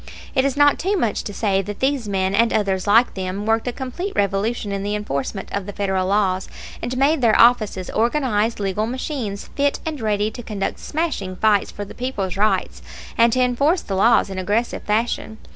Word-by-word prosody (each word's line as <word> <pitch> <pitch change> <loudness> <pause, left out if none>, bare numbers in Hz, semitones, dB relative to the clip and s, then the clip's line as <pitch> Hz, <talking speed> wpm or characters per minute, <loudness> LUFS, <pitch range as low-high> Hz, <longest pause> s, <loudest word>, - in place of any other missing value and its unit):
It 265 - +2
is 275 0 -1
not 290 0 +5
too 390 +3 0
much 230 - 0
to - - -4
say 195 -2 0
that 205 +1 -7
these 265 -5 0
men, 190 -1 0
and 230 +3 +3
others 195 -2 0
like 230 +4 +5
them, 190 +2 -4
worked 225 +2 +1
a - - +1
complete 270 +11 -5
revolution 205 +2 0
in 200 0 -2
the 205 +1 -2
enforcement 195 -2 -4
of 200 -1 -3
the 205 - -6
Federal 190 -2 -1
laws, 190 -2 +1 0.3
and 245 +2 -3
made 280 +3 +3
their 230 -3 +4
offices 215 -6 +3
organized 230 -2 +1
legal 205 +2 -1
machines 245 -5 -4
fit 285 0 +1
and 310 -5 -4
ready 210 -1 0
to 240 - -8
conduct 210 -4 -4
smashing 290 - -3
fights 210 0 +2
for 205 - -6
the - - -11
people's 225 -8 -3
rights 210 +2 0 0.3
and 235 -1 +4
to 255 - +2
enforce 280 +8 +2
the 195 - -4
laws 200 0 +4
in 190 - -4
aggressive 210 +6 -1
fashion. 220 0 -1
215 Hz, 195 wpm, -21 LUFS, 200-250 Hz, 0.3 s, not